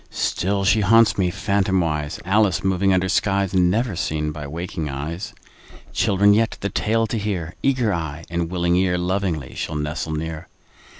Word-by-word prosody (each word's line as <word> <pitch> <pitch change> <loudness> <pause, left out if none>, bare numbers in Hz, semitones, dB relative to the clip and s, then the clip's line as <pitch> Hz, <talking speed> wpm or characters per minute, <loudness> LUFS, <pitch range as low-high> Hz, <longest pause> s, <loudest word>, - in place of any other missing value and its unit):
Still 100 +2 -1
she 110 +3 +4
haunts 115 +2 +5
me, 90 -2 +2
phantomwise, 95 -6 0
Alice 105 +1 +2
moving 95 0 +2
under 95 0 +2
skies 100 0 +1
Never 95 +4 +2
seen 75 -1 -2
by 75 -1 -7
waking 80 0 -4
eyes. 80 +7 -5 0.6
Children 100 +1 +4
yet, 110 +1 +1
the 100 - -1
tale 115 +2 +1
to 110 +1 -2
hear, 90 -5 -3
Eager 125 -6 +1
eye 80 -1 -4
and 85 -1 -2
willing 85 -1 +1
ear, 90 -1 +2
Lovingly 90 -6 -2
shall 80 - -4
nestle 75 +1 -3
near. 80 0 -5
90 Hz, 160 wpm, -22 LUFS, 80-100 Hz, 0.6 s, haunts